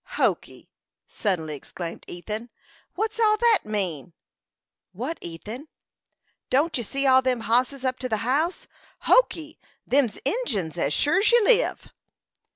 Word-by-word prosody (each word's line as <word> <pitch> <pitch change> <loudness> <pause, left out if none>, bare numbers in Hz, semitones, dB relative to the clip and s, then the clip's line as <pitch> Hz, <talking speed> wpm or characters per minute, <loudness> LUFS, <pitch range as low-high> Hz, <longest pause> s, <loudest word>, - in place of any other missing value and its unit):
"Hokee!" - - -1 0.4
suddenly 170 -7 -2
exclaimed 165 +4 -8
Ethan. 215 +7 -6 0.5
"What's 440 +3 -2
all 430 -1 +4
that 460 -2 +4
mean?" 180 -7 -3 0.8
"What, 255 - -4
Ethan?" 210 - -8 0.8
"Don't 300 +5 +2
you 240 - -1
see 275 +6 -2
all 260 -1 +6
them 255 -2 0
hosses 250 +4 +1
up 255 0 -1
to 255 - -3
the 220 - 0
house? 310 +8 0 0.4
Hokee! 325 -10 +2 0.3
Them's 265 -5 +1
Injins, 225 - -1
as 140 - +1
sure's 370 - +3
you 475 -1 +5
live!" - - +2
255 Hz, 130 wpm, -25 LUFS, 210-335 Hz, 0.8 s, all